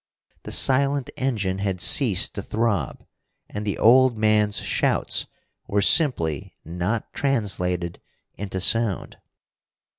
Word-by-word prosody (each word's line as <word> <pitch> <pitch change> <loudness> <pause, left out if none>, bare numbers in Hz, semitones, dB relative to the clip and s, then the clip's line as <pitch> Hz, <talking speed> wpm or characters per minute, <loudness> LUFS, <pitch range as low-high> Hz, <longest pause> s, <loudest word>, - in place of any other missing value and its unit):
The - - -9
silent 140 0 +1
engine 105 -8 -2
had 95 -2 -3
ceased - - +3
to - - -5
throb, 105 - -3 0.4
and 105 0 -7
the 100 - -2
old 125 +1 +4
man's 105 -1 +1
shouts - - -1 0.4
were 100 0 0
simply 85 - +2
not 90 +7 -4
translated 90 -10 -2 0.3
into 95 -2 -5
sound. 115 -1 +1
105 Hz, 110 wpm, -23 LUFS, 95-120 Hz, 0.4 s, old